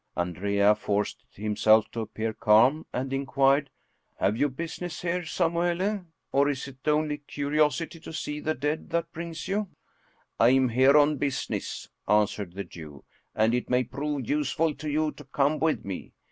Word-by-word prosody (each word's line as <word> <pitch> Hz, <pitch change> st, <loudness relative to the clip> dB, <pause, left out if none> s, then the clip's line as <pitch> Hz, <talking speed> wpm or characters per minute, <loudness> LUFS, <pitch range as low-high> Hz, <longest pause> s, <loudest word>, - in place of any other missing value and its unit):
Andrea 100 Hz, +4 st, +2 dB
forced 105 Hz, 0 st, -2 dB
himself 110 Hz, +1 st, +2 dB
to 115 Hz, -, -5 dB
appear 110 Hz, 0 st, -3 dB
calm, 120 Hz, +10 st, +4 dB
and 130 Hz, +2 st, -3 dB
inquired, 135 Hz, +1 st, +2 dB, 0.3 s
" -, -, -46 dB
Have 100 Hz, +3 st, +2 dB
you 145 Hz, +5 st, +2 dB
business 165 Hz, +4 st, -6 dB
here, 180 Hz, +1 st, 0 dB
Samuele? 175 Hz, +3 st, 0 dB, 0.2 s
or 140 Hz, +1 st, +3 dB
is 140 Hz, -1 st, -3 dB
it 130 Hz, +1 st, -13 dB
only 150 Hz, -1 st, +1 dB
curiosity 150 Hz, +3 st, 0 dB
to 160 Hz, -, -9 dB
see 150 Hz, -1 st, -4 dB
the 155 Hz, +1 st, -1 dB
dead 150 Hz, +4 st, -2 dB
that 170 Hz, 0 st, -1 dB
brings 165 Hz, 0 st, -6 dB
you?" 205 Hz, +1 st, -1 dB, 0.4 s
" -, -, -36 dB, 0.3 s
I 115 Hz, -, +6 dB
am 130 Hz, 0 st, +4 dB
here 130 Hz, +5 st, +5 dB
on 150 Hz, 0 st, +4 dB
business," 140 Hz, 0 st, -3 dB, 0.2 s
answered 105 Hz, -3 st, +1 dB
the 100 Hz, -, -3 dB
Jew, 80 Hz, -6 st, -11 dB, 0.2 s
" -, -, -44 dB
and 110 Hz, +2 st, +3 dB
it 125 Hz, -, -1 dB
may 125 Hz, 0 st, +3 dB
prove 140 Hz, +1 st, -4 dB
useful 150 Hz, +2 st, +1 dB
to 150 Hz, +2 st, -6 dB
you 155 Hz, +1 st, +1 dB
to 150 Hz, -, -13 dB
come 140 Hz, +2 st, +1 dB
with 160 Hz, -1 st, 0 dB
me. 95 Hz, -2 st, -6 dB
140 Hz, 175 wpm, -27 LUFS, 115-155 Hz, 0.4 s, I